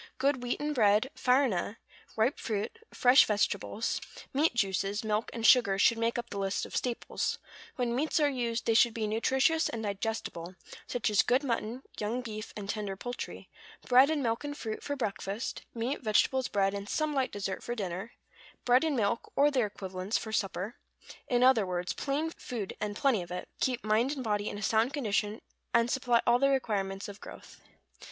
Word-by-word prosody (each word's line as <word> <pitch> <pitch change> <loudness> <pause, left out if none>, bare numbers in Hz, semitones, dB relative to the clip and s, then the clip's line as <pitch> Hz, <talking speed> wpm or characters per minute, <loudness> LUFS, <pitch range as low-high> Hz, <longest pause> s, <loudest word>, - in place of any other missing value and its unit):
Good 270 -1 +1
wheaten 295 +5 -2
bread, 220 +1 +3
farina, 250 -7 +1 0.4
ripe 225 +6 +1
fruit, 215 - -3
fresh 255 +3 +6
vegetables, 210 +1 -1 0.3
meat 290 -1 +2
juices, 200 -1 0
milk, 215 +1 -1
and 230 -1 -4
sugar, 220 -6 +6
should 230 +3 +4
make 230 +1 0
up 240 0 -5
the 200 - -4
list 195 0 -1
of - - -9
staples; 245 -2 -2 0.4
when 245 -3 -1
meats 305 +5 +1
are 295 - +4
used 240 -4 -2
they 225 - +3
should 230 0 +4
be 220 -2 -1
nutritious 265 +8 +2
and 225 -1 -4
digestible, 200 -4 -4 0.3
such 240 -3 -1
as 205 - +5
good 255 +4 +2
mutton, 240 0 -2 0.2
young 220 +4 -1
beef, 215 -2 -6
and 200 -2 -6
tender 205 -2 -3
poultry; 245 +5 -6 0.4
bread 255 +3 +7
and 305 -3 0
milk 230 +1 -1
and 290 0 -5
fruit, 220 -2 -5
for 285 - -3
breakfast; 210 -2 -3
meat, 235 +5 -2
vegetables, 245 +4 +2
bread 195 -1 +1
and 200 0 -5
some 310 -1 0
light 265 -2 0
dessert, 195 -1 -4
for 240 - -4
dinner; 195 +1 -4 0.5
bread 250 +3 +5
and 315 -3 +1
milk, 220 +1 -1
or 290 +1 +4
their 250 -6 +2
equivalents, 190 0 -3
for 220 - -6
supper; 200 0 -2 0.5
in 245 0 +2
other 255 -4 +6
words, 180 -1 -2
plain 295 +3 -2
food 225 - -6
and 205 -1 -2
plenty 245 -4 +2
of 175 - -8
it, 180 0 -5
will - - -43
keep 250 -1 0
mind 220 +6 +2
and 270 -3 -5
body 210 -2 -1
in - - -6
a 210 - -6
sound 225 +6 +2
condition, 210 -5 -1 0.3
and 235 +1 +3
supply 245 -3 +2
all 240 +1 +4
the 275 +1 +4
requirements 200 -7 -1
of 205 +1 -10
growth. - - -12
230 Hz, 190 wpm, -30 LUFS, 205-255 Hz, 0.5 s, bread